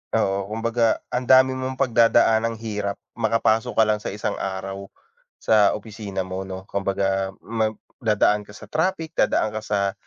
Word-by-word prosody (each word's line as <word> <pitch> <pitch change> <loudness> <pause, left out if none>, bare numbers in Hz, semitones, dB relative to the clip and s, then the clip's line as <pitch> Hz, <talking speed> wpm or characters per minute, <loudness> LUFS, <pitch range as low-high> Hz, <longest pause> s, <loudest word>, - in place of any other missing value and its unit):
Oo, 95 0 0
kumbaga 115 +1 0
ang 125 0 -2
dami 130 0 +6
mong 130 0 -3
pagdadaanang 115 -2 +3
hirap 105 -3 -3 0.2
makapasok 110 0 +1
ka 110 - +5
lang 105 -1 +1
sa - - -7
isang 105 +2 -3
araw 95 +1 -5 0.5
sa 105 -2 +3
opisina 105 -4 -5
mo 95 +1 -5
'no. 95 0 -7
Kumbaga 95 -1 -1
ma 110 -1 0 0.3
dadaan 105 -2 +2
ka 105 - -13
sa - - -13
traffic, 160 0 -1
dadaan 110 - +2
ka 110 - -3
sa 100 -2 -1
110 Hz, 155 wpm, -23 LUFS, 100-115 Hz, 0.5 s, dami